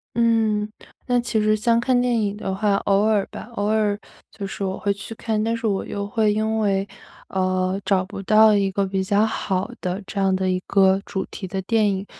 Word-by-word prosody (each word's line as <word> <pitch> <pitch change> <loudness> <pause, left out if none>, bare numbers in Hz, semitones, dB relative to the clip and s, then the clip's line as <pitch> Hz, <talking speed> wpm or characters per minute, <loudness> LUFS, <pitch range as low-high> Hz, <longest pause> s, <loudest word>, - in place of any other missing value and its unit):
嗯， 225 -3 +2 0.4
那 245 -1 +2
其 230 -2 -1
实 215 0 +3
像 230 +2 +2
看 245 +1 +2
电 245 -2 +1
影 205 -2 -1
的 200 -2 -4
话， 205 0 +1
偶 200 0 +3
尔 215 -2 +3
吧， - - -8
偶 205 - -1
尔 210 -1 +1 0.3
就 200 -2 -6
是 195 - -5
我 190 0 -2
会 200 - 0
去 200 +3 -6
看。 220 -1 -2
但 230 +1 0
是 230 -1 -2
我 195 -2 -1
又 200 0 -4
会 210 0 +1
因 220 +1 0
为， 195 -2 +1 0.4
呃， 185 0 0
找 190 -2 +2
不 195 - -8
到 215 +2 +6
一 195 -1 +1
个 200 +1 0
比 190 0 -1
较 200 +2 +2
好 195 -3 -1
的 185 +2 -3
这 200 - -4
样 195 -1 +2
的 185 0 0
一 185 0 +1
个 195 -1 +4
主 190 - -3
题 190 - -7
的 190 +1 -3
电 215 +2 +2
影， 195 +1 -3
205 Hz, 235 characters per minute, -22 LUFS, 195-220 Hz, 0.4 s, 到